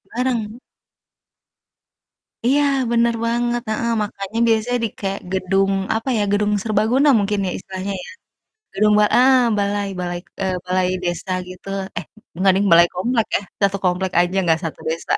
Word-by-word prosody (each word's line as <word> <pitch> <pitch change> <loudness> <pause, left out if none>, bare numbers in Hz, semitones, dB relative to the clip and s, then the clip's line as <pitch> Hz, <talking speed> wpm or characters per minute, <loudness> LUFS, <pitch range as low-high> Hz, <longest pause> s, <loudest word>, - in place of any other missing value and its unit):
Bareng. 240 -3 -2 1.8
Iya, 275 +4 +3 0.3
bener 235 0 +3
banget, 240 +1 0
heeh, 230 +2 -1
makannya 205 +1 -4
biasanya 230 +2 +1
di 220 - -2
kayak 195 0 -3
gedung, 195 +1 +1 0.2
apa 225 +4 -2
ya, - - +1
gedung 205 0 +1
serbaguna 225 +7 +2
mungkin 205 0 0
ya, - - -2
istilahnya 190 +1 -5
ya. - - -11 0.6
Gedung 210 +2 +3
ba - - +5
ah, 260 +1 +6 0.2
balai, 200 0 -1
balai, 175 -1 -3 0.2
eee, 190 -1 0
balai 185 0 +1 0.2
desa 175 +1 -3 0.2
gitu, 185 +1 -11 0.3
eh, - - -7 0.4
gak 195 - +6
deng, 200 +2 +1
balai 170 +1 +8
komplek 225 +5 0
ya, - - -1 0.3
satu 200 0 -2
komplek 180 +1 0
aja, 175 +2 0
gak 160 - +3
satu 160 - -5
desa. 165 +1 -3
205 Hz, 155 wpm, -20 LUFS, 185-230 Hz, 1.8 s, balai